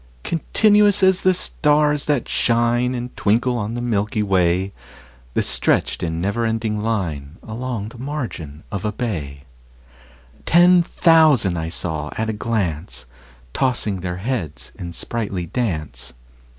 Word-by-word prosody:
Continuous 205 Hz, +4 st, +3 dB
as 190 Hz, -1 st, +5 dB
the 185 Hz, -, +4 dB
stars 150 Hz, -3 st, +1 dB
that 145 Hz, -5 st, 0 dB
shine 120 Hz, +2 st, +1 dB
And 120 Hz, 0 st, -5 dB
twinkle 120 Hz, +4 st, +1 dB
on 105 Hz, +2 st, -3 dB
the 120 Hz, -, -3 dB
milky 105 Hz, -2 st, 0 dB
way, 95 Hz, 0 st, +1 dB, 0.6 s
The -, -, +2 dB
stretched -, -, 0 dB
in 80 Hz, -1 st, -2 dB
never 100 Hz, +6 st, -1 dB
ending 110 Hz, -2 st, -1 dB
line 85 Hz, -9 st, -2 dB
Along 115 Hz, -2 st, -4 dB
the 115 Hz, -, -13 dB
margin 120 Hz, -, -5 dB
of 100 Hz, -3 st, -3 dB
a 105 Hz, -, 0 dB
bay: 80 Hz, -, -4 dB, 1.0 s
Ten 175 Hz, +1 st, +6 dB
thousand 135 Hz, -, +3 dB
saw 80 Hz, -3 st, -3 dB
I -, -, -1 dB
at 110 Hz, -, -2 dB
a -, -, -5 dB
glance, 85 Hz, -, -2 dB, 0.5 s
Tossing 120 Hz, -7 st, 0 dB
their 90 Hz, 0 st, -4 dB
heads 95 Hz, -, -4 dB
in 85 Hz, -1 st, -7 dB
sprightly 100 Hz, -1 st, -4 dB
dance. 85 Hz, -, -3 dB
110 Hz, 135 wpm, -21 LUFS, 90-130 Hz, 1.0 s, Ten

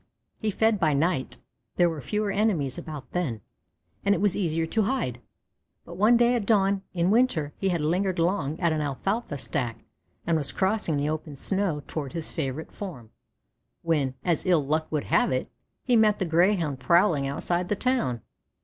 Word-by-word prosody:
He 215 Hz, -, -1 dB
fed 220 Hz, +1 st, +2 dB
by 155 Hz, -5 st, +2 dB
night; 150 Hz, -2 st, 0 dB, 0.4 s
there 175 Hz, -, +4 dB
were 160 Hz, -3 st, -3 dB
fewer 210 Hz, +6 st, -1 dB
enemies 185 Hz, -, 0 dB
about 150 Hz, -4 st, -8 dB
then, 145 Hz, -12 st, -2 dB, 0.6 s
and 200 Hz, 0 st, +3 dB
it -, -, -1 dB
was 200 Hz, -2 st, +2 dB
easier 165 Hz, -4 st, 0 dB
to 220 Hz, +7 st, 0 dB
hide; 195 Hz, -, -1 dB, 0.6 s
but -, -, -9 dB
one 220 Hz, +5 st, +5 dB
day 240 Hz, +1 st, +4 dB
at 225 Hz, -5 st, -1 dB
dawn 200 Hz, -3 st, +3 dB
in 175 Hz, +2 st, +2 dB
winter 195 Hz, -, +2 dB
he 195 Hz, -, +1 dB
had 170 Hz, -3 st, 0 dB
lingered 180 Hz, +4 st, 0 dB
long 165 Hz, -3 st, 0 dB
at 170 Hz, -3 st, +2 dB
an 155 Hz, -, -1 dB
alfalfa 150 Hz, -, -2 dB
stack 125 Hz, -4 st, -3 dB, 0.4 s
and 170 Hz, -, +2 dB
was 145 Hz, -3 st, -2 dB
crossing 190 Hz, -5 st, 0 dB
the 145 Hz, +1 st, 0 dB
open 155 Hz, -1 st, -4 dB
snow 180 Hz, -1 st, 0 dB
toward 145 Hz, -3 st, -5 dB
his 165 Hz, -2 st, -3 dB
favorite 150 Hz, 0 st, -4 dB
form, 135 Hz, -, -8 dB, 0.7 s
when, 145 Hz, -6 st, 0 dB
as 170 Hz, -4 st, +1 dB
ill 170 Hz, -6 st, +2 dB
luck 155 Hz, +2 st, -1 dB
would 150 Hz, -2 st, 0 dB
have -, -, +2 dB
it, 130 Hz, 0 st, -2 dB, 0.3 s
he 250 Hz, -, +2 dB
met 215 Hz, -2 st, +4 dB
the 190 Hz, -, -1 dB
Greyhound 170 Hz, -4 st, +2 dB
prowling 170 Hz, -2 st, +3 dB
outside 175 Hz, +5 st, -2 dB
the 205 Hz, -, +1 dB
town. 230 Hz, -, 0 dB
170 Hz, 180 wpm, -26 LUFS, 145-200 Hz, 0.7 s, one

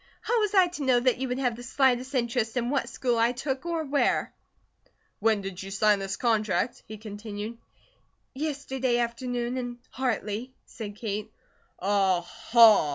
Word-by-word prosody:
How 480 Hz, -, +1 dB
was 420 Hz, -2 st, 0 dB
I 375 Hz, -1 st, +7 dB
to 345 Hz, -4 st, -5 dB
know 255 Hz, -2 st, +4 dB
that 250 Hz, 0 st, +2 dB
you 265 Hz, -, -1 dB
would 250 Hz, 0 st, -2 dB
have 250 Hz, -3 st, 0 dB
the 240 Hz, -, -9 dB
slightest 255 Hz, +1 st, +1 dB
interest 235 Hz, -1 st, 0 dB
in 240 Hz, +1 st, 0 dB
what 280 Hz, -, 0 dB
school 245 Hz, -3 st, 0 dB
I 235 Hz, +2 st, +3 dB
took, 265 Hz, +4 st, -3 dB
or 335 Hz, -2 st, -1 dB
where." 285 Hz, -1 st, +1 dB, 0.9 s
"When 220 Hz, -1 st, +2 dB
did 195 Hz, -2 st, -6 dB
you 190 Hz, -, -7 dB
sign 205 Hz, +1 st, +3 dB
this 195 Hz, 0 st, -3 dB
contract?" 220 Hz, -2 st, +1 dB
he 215 Hz, -, -7 dB
continued. 210 Hz, +1 st, -7 dB, 0.7 s
"Yesterday 265 Hz, -4 st, -1 dB
afternoon, 240 Hz, +1 st, -2 dB
in 245 Hz, -1 st, -5 dB
Hartley," 245 Hz, -1 st, -2 dB
said 210 Hz, -3 st, -8 dB
Kate. 210 Hz, -1 st, -4 dB, 0.5 s
"Aha! 200 Hz, +1 st, +4 dB
240 Hz, 160 wpm, -27 LUFS, 210-260 Hz, 0.9 s, I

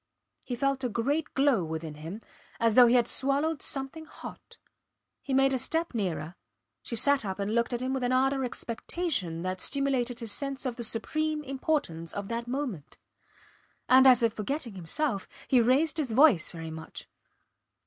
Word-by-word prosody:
He 245 Hz, -, -4 dB
felt 275 Hz, +1 st, 0 dB
a 250 Hz, -, 0 dB
great 280 Hz, +8 st, -1 dB
glow 270 Hz, -8 st, +3 dB
within 160 Hz, -1 st, -5 dB
him, 160 Hz, +8 st, -8 dB, 0.4 s
as 230 Hz, -1 st, +3 dB
though 245 Hz, +1 st, +8 dB
he 240 Hz, -, +4 dB
had 240 Hz, -1 st, +4 dB
swallowed 280 Hz, +5 st, 0 dB
something 275 Hz, +3 st, -4 dB
hot. -, -, -11 dB, 0.6 s
He 275 Hz, -, -7 dB
made 270 Hz, 0 st, +4 dB
a 260 Hz, -, +1 dB
step 325 Hz, +6 st, 0 dB
nearer. 180 Hz, -7 st, -2 dB, 0.5 s
She 235 Hz, -, -6 dB
sat 280 Hz, +3 st, +3 dB
up 190 Hz, -2 st, -4 dB
and 200 Hz, +1 st, -2 dB
looked 235 Hz, +1 st, +1 dB
at 240 Hz, 0 st, -2 dB
him 260 Hz, +1 st, -1 dB
with 265 Hz, -, -1 dB
an 245 Hz, 0 st, 0 dB
ardour 270 Hz, +1 st, +2 dB
of 265 Hz, -, 0 dB
expectation 230 Hz, -, -3 dB
that 185 Hz, 0 st, -3 dB
stimulated 265 Hz, -3 st, 0 dB
his 230 Hz, -3 st, -2 dB
sense 275 Hz, +2 st, -2 dB
of 250 Hz, -2 st, -2 dB
the 235 Hz, -, -5 dB
supreme 305 Hz, +7 st, -1 dB
importance 265 Hz, -, -2 dB
of 200 Hz, -1 st, -5 dB
that 235 Hz, +1 st, -3 dB
moment. 245 Hz, -, -4 dB, 0.9 s
And 260 Hz, +1 st, +7 dB
as 250 Hz, -2 st, +6 dB
if 225 Hz, -2 st, +3 dB
forgetting 235 Hz, +2 st, -4 dB
himself 195 Hz, -, -2 dB, 0.2 s
he 255 Hz, -2 st, +5 dB
raised 280 Hz, +8 st, +2 dB
his 275 Hz, -7 st, -1 dB
voice 255 Hz, -, +5 dB
very 165 Hz, -2 st, -7 dB
much. 160 Hz, 0 st, -8 dB
250 Hz, 180 wpm, -29 LUFS, 210-275 Hz, 0.9 s, though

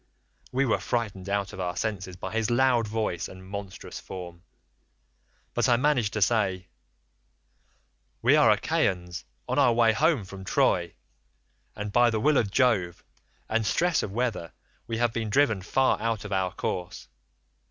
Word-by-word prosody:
"We 135 Hz, +2 st, +1 dB
were 115 Hz, -, +1 dB
frightened 100 Hz, -5 st, -3 dB
out 100 Hz, -1 st, -1 dB
of -, -, -9 dB
our 90 Hz, -1 st, -2 dB
senses 95 Hz, -4 st, -3 dB
by 90 Hz, -, -6 dB
his 110 Hz, -1 st, 0 dB
loud 120 Hz, -2 st, +3 dB
voice 105 Hz, -5 st, -2 dB
and 95 Hz, 0 st, -12 dB
monstrous 100 Hz, -1 st, -7 dB
form, 90 Hz, -2 st, -9 dB, 1.1 s
but -, -, +1 dB
I 120 Hz, -, +5 dB
managed 125 Hz, -6 st, +1 dB
to 105 Hz, -, +2 dB
say, 95 Hz, -4 st, 0 dB, 1.5 s
'We -, -, +5 dB
are -, -, +5 dB
Achaeans 90 Hz, -2 st, 0 dB, 0.2 s
on -, -, 0 dB
our 130 Hz, -4 st, +5 dB
way 115 Hz, -1 st, +4 dB
home 150 Hz, -, +2 dB
from 95 Hz, +1 st, -9 dB
Troy, 85 Hz, -2 st, +1 dB, 0.8 s
but 105 Hz, 0 st, -5 dB
by 120 Hz, +2 st, +5 dB
the 110 Hz, -1 st, -1 dB
will 150 Hz, +5 st, +3 dB
of 110 Hz, -, +1 dB
Jove, 100 Hz, -7 st, +1 dB, 0.4 s
and 115 Hz, 0 st, 0 dB
stress 170 Hz, -, +1 dB
of 100 Hz, -, -4 dB
weather, 115 Hz, -7 st, -2 dB, 0.3 s
we 115 Hz, -, -3 dB
have 120 Hz, -1 st, +1 dB
been 110 Hz, -2 st, -2 dB
driven 110 Hz, -5 st, +2 dB
far 130 Hz, +7 st, +1 dB
out 115 Hz, -2 st, -1 dB
of 105 Hz, -, -7 dB
our 95 Hz, -1 st, 0 dB
course. 90 Hz, -1 st, -4 dB
105 Hz, 160 wpm, -27 LUFS, 95-120 Hz, 1.5 s, I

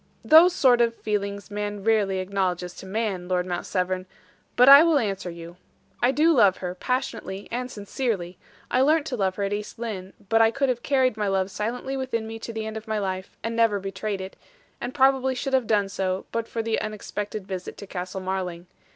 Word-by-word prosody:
"Those 325 Hz, +4 st, +8 dB
sort 255 Hz, -8 st, +4 dB
of 230 Hz, -1 st, +2 dB
feelings 200 Hz, -2 st, -3 dB
man 205 Hz, -1 st, -4 dB
rarely 210 Hz, -3 st, +2 dB
acknowledges 185 Hz, -2 st, -2 dB
to 190 Hz, -, -9 dB
man, 195 Hz, -3 st, -2 dB
Lord 180 Hz, -1 st, 0 dB
Mount 175 Hz, -1 st, -4 dB
Severn, 185 Hz, 0 st, -1 dB, 0.5 s
but 250 Hz, +1 st, +6 dB
I 280 Hz, +1 st, +11 dB
will 330 Hz, -2 st, +4 dB
answer 195 Hz, -7 st, -2 dB
you. 170 Hz, 0 st, -10 dB, 0.4 s
I 245 Hz, -, +4 dB
do 305 Hz, +5 st, +4 dB
love 200 Hz, -9 st, +5 dB
her, 180 Hz, -1 st, -4 dB
passionately 230 Hz, -3 st, -3 dB
and 250 Hz, +2 st, -3 dB
sincerely; 200 Hz, -5 st, -3 dB, 0.3 s
I 255 Hz, -, +3 dB
learnt 305 Hz, +2 st, +3 dB
to 275 Hz, -, -3 dB
love 190 Hz, -4 st, 0 dB
her 200 Hz, -, -2 dB
at 200 Hz, +1 st, -1 dB
East 210 Hz, 0 st, -5 dB
Lynne; 205 Hz, -5 st, -5 dB
but 225 Hz, +2 st, +4 dB
I 225 Hz, -, +6 dB
could 275 Hz, +3 st, 0 dB
have 245 Hz, -1 st, -1 dB
carried 260 Hz, -4 st, +2 dB
my 210 Hz, -1 st, 0 dB
love 195 Hz, 0 st, 0 dB
silently 245 Hz, +6 st, -3 dB
within 260 Hz, -4 st, -2 dB
me 225 Hz, 0 st, -7 dB
to 230 Hz, -, -6 dB
the 220 Hz, -1 st, -4 dB
end 220 Hz, 0 st, -5 dB
of 220 Hz, +1 st, -9 dB
my 220 Hz, 0 st, -1 dB
life 190 Hz, -2 st, -4 dB
and 230 Hz, +1 st, -2 dB
never 225 Hz, -3 st, +3 dB
betrayed 195 Hz, +1 st, -4 dB
it; 190 Hz, 0 st, -8 dB, 0.5 s
and 245 Hz, +3 st, -5 dB
probably 265 Hz, -1 st, +3 dB
should 270 Hz, +1 st, -3 dB
have 260 Hz, -4 st, +2 dB
done 205 Hz, -2 st, +2 dB
so, 190 Hz, -1 st, -2 dB
but 230 Hz, 0 st, -2 dB
for 230 Hz, -, -3 dB
the 225 Hz, 0 st, 0 dB
unexpected 210 Hz, -1 st, -5 dB
visit 185 Hz, -2 st, -6 dB
to -, -, -8 dB
Castle 185 Hz, 0 st, -5 dB
Marling. 185 Hz, -2 st, -3 dB
210 Hz, 210 wpm, -25 LUFS, 190-245 Hz, 0.5 s, I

